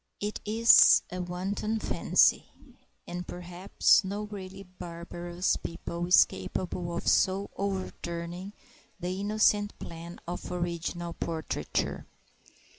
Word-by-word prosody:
It 210 +1 -3
is 225 +2 +7
a 180 0 -3
wanton 190 +5 -2
fancy; - - +3 0.6
and 175 0 -6
perhaps 180 +4 +2
no 200 +2 -3
really 195 -2 -8
barbarous 175 0 -3
people 170 +1 -5
is 180 - +8
capable 170 - -4
of - - -5
so 195 +1 +2
overturning 185 -1 -4 0.5
the 180 +2 -3
innocent 205 0 +2
plan 170 +1 -9
of 175 +1 -5
original 175 -1 -3
portraiture. 160 -2 -3
180 Hz, 105 wpm, -29 LUFS, 170-200 Hz, 0.6 s, is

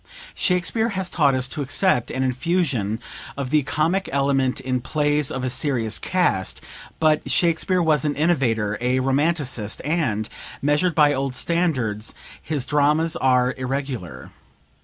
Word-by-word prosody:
["Shakespeare 185 +6 +1
has 190 -3 -4
taught 140 -5 +3
us 130 0 0
to 145 - -3
accept 140 - +1
an 130 - -2
infusion 130 - 0 0.4
of 135 -2 -4
the 150 -1 +4
comic 165 +7 0
element 135 -1 +1
in 130 -1 -2
plays 145 +1 0
of 130 - -4
a 130 - 0
serious 120 -6 0
cast; 175 - 0 0.4
but 155 -1 +2
Shakespeare 175 +1 +2
was 155 -4 +2
an 150 -1 0
innovator, 120 -10 +1
a 125 +1 +1
Romanticist, 135 -4 0
and, 135 -10 0 0.3
measured 150 +5 +1
by 150 -2 +5
old 135 -1 -2
standards, 130 -12 -1 0.3
his 145 -5 -3
dramas 150 +3 +2
are 125 -1 +2
irregular. 125 - -4
140 Hz, 140 wpm, -22 LUFS, 125-160 Hz, 0.4 s, by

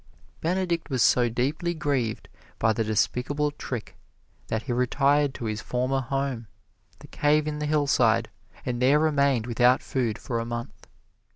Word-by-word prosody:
Benedict 170 -1 -1
was 130 -4 +2
so 120 -1 +4
deeply 145 +9 -1
grieved 135 -8 -1 0.3
by 110 0 +2
the 115 +1 0
despicable 125 +7 0
trick 130 -5 -6 0.5
that 110 0 -2
he 125 - -2
retired 140 +3 +2
to 120 - -5
his 110 0 -3
former 130 +3 -1
home, 135 -3 -3 0.5
the - - -14
cave 150 +1 +1
in 150 0 -3
the 150 - -2
hillside, 125 -7 +2 0.4
and 120 -1 -2
there 135 +4 +5
remained 140 -6 +2
without 125 +2 +3
food 120 -5 -1
for 115 -2 -3
a - - -2
month. 120 0 -7
130 Hz, 155 wpm, -26 LUFS, 120-145 Hz, 0.5 s, there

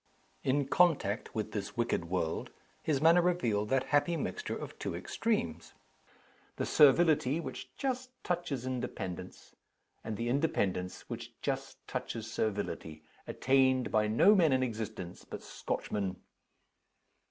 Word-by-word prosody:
In 135 +1 +1
contact 145 - +2
with 110 -2 -2
this 100 +1 -4
wicked 120 -7 0
world, 85 -2 -2 0.3
his 150 -4 +1
manner 165 +4 +6
revealed 120 -13 +1
that 135 -1 +1
happy 165 +4 +3
mixture 430 - -3
of - - -8
two - - -3
extremes 85 - -2 0.8
the - - -1
servility 150 -1 +5
which - - -6
just 260 -2 -2
touches 170 -8 -2
independence, 95 -8 -5 0.5
and 110 -2 -4
the 115 - -2
independence 100 - 0
which - - -7
just - - -3
touches 115 -2 -4
servility 100 -8 -3 0.2
attained 130 -1 +3
by 105 0 +3
no 145 - +6
men 170 -7 +5
in 130 0 +3
existence 110 -7 -5
but - - -8
Scotchmen. 100 -3 -3
130 Hz, 125 wpm, -32 LUFS, 105-160 Hz, 0.8 s, manner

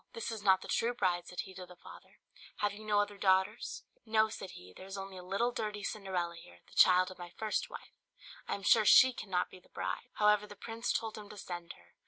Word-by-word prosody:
"This 230 - -4
is 220 -2 -5
not 190 -2 +4
the - - -9
true 240 +1 +1
bride," 175 -5 0
said 180 - -4
he 190 - -11
to 185 -1 -9
the 180 - -13
father; - - -15 0.4
"have 205 -1 0
you 210 +1 -10
no 210 -1 +2
other 205 -1 -1
daughters?" 190 +3 +1 0.2
"No," 220 -1 +3
said 195 -3 -7
he; 90 +1 -13
"there 190 - -11
is 195 +1 -6
only 195 0 -7
a - - -7
little 200 +7 0
dirty 210 -3 -4
Cinderella 185 -5 -2
here, 85 - -14
the - - -19
child 185 0 +6
of 185 - -13
my 175 0 -7
first 215 +4 -2
wife; - - -10 0.5
I - - -1
am 200 - -9
sure 220 +3 +6
she 255 +4 +8
cannot 185 -6 -2
be 185 - -12
the 180 - -26
bride." 250 - -4
However, 210 0 +3
the 205 - -11
prince 230 +3 -3
told 220 -1 -2
him 205 -1 -11
to 210 - -10
send 175 -3 -6
her. - - -22
200 Hz, 245 wpm, -33 LUFS, 185-215 Hz, 0.5 s, she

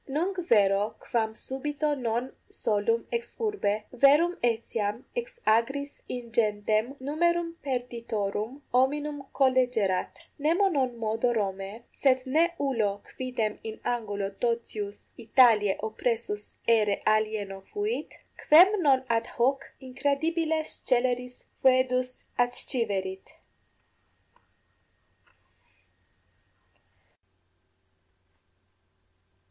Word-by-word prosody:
Nunc 340 +8 -1
vero 205 -1 +3
quam 220 -2 -1
subito 295 +5 -2
non 245 -1 -2 0.2
solum 220 +2 0
ex 235 0 -4
urbe, 405 - -1
verum 290 +7 +5
etiam 225 -1 -1
ex 485 0 -5
agris 270 +6 +1
ingentem 220 0 0
numerum 335 +4 0
perditorum 235 -2 -3
hominum 290 +3 +1
collegerat! 250 -8 +2 0.3
Nemo 340 +7 +3
non 260 -7 0
modo 225 +2 0
Romae, 200 0 -3
sed 260 -2 +2
9 260 - -5
ne 335 +3 +4
ullo 220 -8 0
quidem 250 -5 -3
in 220 -1 -6
angulo 205 -5 -2
totius 210 -2 -3
Italiae 225 -4 +4
oppressus 220 -1 -2
aere 215 -3 +3
alieno 215 -2 0
fuit, 420 +3 -2 0.2
quem 370 +6 +6
non 270 -4 +4
ad 230 -1 0
hoc 270 +3 +1
incredibile 310 +5 0
sceleris 250 -3 -1 0.2
foedus 255 -1 +2 0.2
adsciverit. 210 -6 -1
245 Hz, 85 wpm, -28 LUFS, 215-280 Hz, 0.3 s, quem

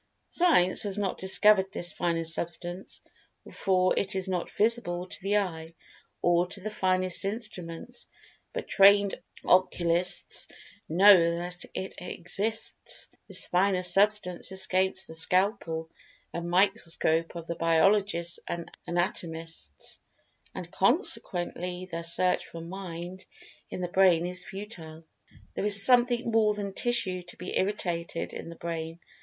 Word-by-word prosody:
Science 320 - +3
has 205 -1 -1
not 200 -2 -2
discovered 190 0 +4
this 175 -3 -4
finer 170 -1 -1
Substance, 175 +3 -4 0.5
for 185 -1 +2
it 195 -1 0
is 190 0 -1
not 180 -2 -2
visible 205 -6 0
to 185 - -4
the 200 +2 +1
eye, 165 -4 -3 0.5
or 175 0 +3
to 195 - 0
the 215 +3 -5
finest 185 -2 0
instruments, 210 +1 -6 0.4
but - - -5
trained 200 0 +5 0.3
Occulists 180 -1 +2 0.4
know 170 -1 +6
that 175 +1 -5
it 190 - -4
exists. 195 +5 -3 0.2
This - - -2
fine 185 0 +1
Substance 190 0 +2
escapes 190 0 +1
the - - -10
scalpel 165 -1 0 0.4
and 170 0 -4
microscope 165 -3 +1
of 170 -1 -6
the 170 - -3
biologists 170 +1 +2
and 170 -1 -5 0.2
anatomists, 165 - -4 0.6
and, 175 -2 -7
consequently, 180 - 0
their 165 0 -3
search 180 +2 +1
for 165 - -9
"Mind" 180 +1 -7 0.5
in - - -5
the 180 - -1
Brain 180 -2 +4
is 180 0 -5
futile. 165 -6 -9 0.5
There - - -3
is 200 -1 +6
something 245 -1 +3
more 215 -2 +3
than 200 -1 -4
"tissue 195 -6 +2
to 175 0 -12
be 180 - -6
irritated" 175 -4 -2
in - - -7
the 170 - -9
Brain. 165 0 -5
180 Hz, 130 wpm, -28 LUFS, 170-200 Hz, 0.6 s, know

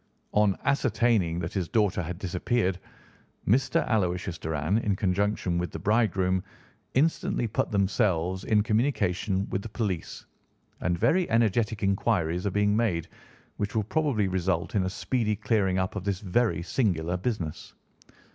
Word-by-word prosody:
On 105 -2 +3
ascertaining 120 - +2
that 85 +2 -4
his 95 -4 -1
daughter 105 -4 +2
had 85 +1 -5
disappeared, 95 +1 -1 0.7
Mr. 130 +4 +2
Aloysius 90 -5 -1
Doran, 80 +6 0
in 105 -3 0
conjunction 95 -2 0
with 90 - -2
the - - -6
bridegroom, 95 -4 +1 0.5
instantly 145 -3 +1
put 110 - -1
themselves 95 -3 +1
in 105 -2 +3
communication 105 -5 0
with 95 - -1
the 115 - -7
police, 100 -7 -3 0.5
and 85 0 0
very 180 - +2
energetic 110 -1 +1
inquiries 95 -3 +1
are - - +2
being 105 +1 +2
made, 105 -8 0 0.5
which 105 +1 -3
will 110 - +2
probably 125 -4 0
result 95 -1 -1
in 100 - +2
a - - -1
speedy 110 +2 -1
clearing 100 -3 +1
up 95 +2 -1
of 100 - -3
this 100 -2 -1
very 100 -3 0
singular 90 -6 0
business. 90 -5 -4
100 Hz, 145 wpm, -27 LUFS, 90-110 Hz, 0.7 s, On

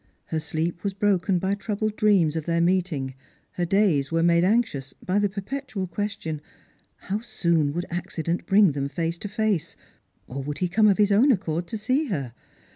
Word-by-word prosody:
Her 160 - -2
sleep 160 +2 -3
was 200 -2 -2
broken 195 -2 +2
by 190 +3 0
troubled 210 +1 -2
dreams 190 -8 +3
of 160 -2 -3
their 170 -1 +1
meet 180 +1 +2
ing; 135 -3 -3 0.4
her 175 - -2
days 170 -7 +2
were 165 0 +2
made 170 0 +4
anxious 190 - +1
by 190 +3 -1
the 205 -1 +2
perpetual 210 +1 -4
question, 180 -5 -4 0.5
How 200 +2 -3
soon 170 -9 +1
would 175 +2 -2
accident 170 -1 -3
bring 200 -3 +5
them 140 0 -2
face 165 +1 -2
to - - -5
face? 210 -4 -1 0.5
Or 135 +2 -5
would 145 +2 -4
he 180 - 0
come 215 +4 +4
of 200 - +4
his 205 -1 +3
own 240 +8 +5
accord 175 -6 -1
to 220 - -4
see 255 +8 0
her 140 - -3
185 Hz, 190 wpm, -25 LUFS, 165-205 Hz, 0.5 s, bring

